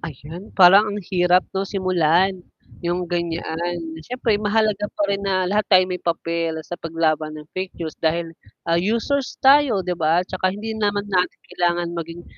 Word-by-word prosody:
Ayun, 160 +5 -9
parang 195 +3 +7
ang 205 0 -3
hirap 180 0 +3
'no 195 0 -1
simulan 185 -1 +1 0.4
yung 175 +1 -1
ganyaan. 170 0 -3 0.2
Syempre 225 +3 -1
mahalaga 210 -1 +1
pa - - -4
rin 200 0 -1
na 190 -2 0
lahat 205 +3 0
tayo 185 -2 +6
may 180 - -3
papel 165 -1 -2
sa 175 - -7
paglaban 155 -2 -1
ng 150 - -9
fake 185 0 -5
news 160 -2 -5
dahil, 165 +1 0 0.3
ah, 170 0 +2
users 235 +8 -1
tayo 270 -7 +5
'di 180 - -1
ba? 160 +3 +3
'Tsaka 185 - -1
hindi 220 +2 -5
naman 205 -1 0
natin 180 -1 0
kailangan 175 -1 0
maging 170 0 -6
180 Hz, 165 wpm, -22 LUFS, 170-200 Hz, 0.4 s, parang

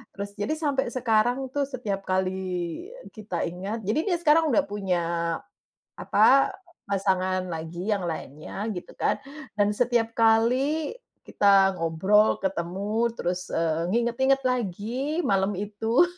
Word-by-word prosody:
terus 200 0 -6
jadi 295 +10 0
sampai 280 -5 0
sekarang 245 +2 +1
tuh 285 - +1
setiap 220 -7 -3
kali 185 0 +1 0.8
kita 205 -6 -3
ingat 195 +6 -5
jadi 220 +9 +1
dia 350 - +2
sekarang 320 0 +4
udah 230 - +3
punya, 190 -4 -1 1.0
apa, 260 +6 +5 0.4
pasangan 190 -2 0
lagi 165 +5 -4
yang 195 -3 0
lainnya 155 +4 -6
gitu 180 - -8
kan, - - +1 0.4
dan 205 0 +4
setiap 235 -2 +1
kali 250 - +3 0.3
kita 195 -2 +4
ngobrol, 190 +6 +3
ketemu, 195 +5 -1
terus, 180 0 -3
eee, 165 +1 0
nginget-nginget 265 +4 +2
lagi 250 - -1
malam 195 0 +2
itu, 215 - +2
210 Hz, 120 wpm, -26 LUFS, 185-245 Hz, 1.0 s, apa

